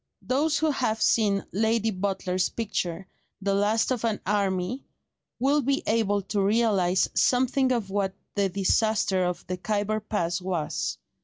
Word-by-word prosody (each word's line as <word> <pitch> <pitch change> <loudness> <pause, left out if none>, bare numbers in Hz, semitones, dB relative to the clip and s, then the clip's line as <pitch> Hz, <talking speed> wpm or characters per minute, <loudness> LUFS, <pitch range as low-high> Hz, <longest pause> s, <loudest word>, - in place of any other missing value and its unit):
Those 295 +5 +1
who 315 -1 +2
have 240 -5 -1
seen 205 -3 +2
Lady 220 +2 +1
Butler's 185 -1 -1
picture, 190 -5 -3 0.3
"The 200 0 0
Last 210 +5 +2
of 245 -3 -1
an 225 -3 0
Army," 195 +3 -1 0.5
will 280 +4 +2
be 275 +2 0
able 205 -3 +1
to 200 +1 -1
realise 195 -4 +2
something 260 0 +2
of 225 -6 -1
what 195 -1 -1 0.2
the 200 -2 +1
disaster 195 0 +1
of 180 -1 -3
the 185 - -4
Khyber 210 +2 -1
pass 185 -4 -2
was. 180 -4 -2
205 Hz, 145 wpm, -26 LUFS, 190-230 Hz, 0.5 s, who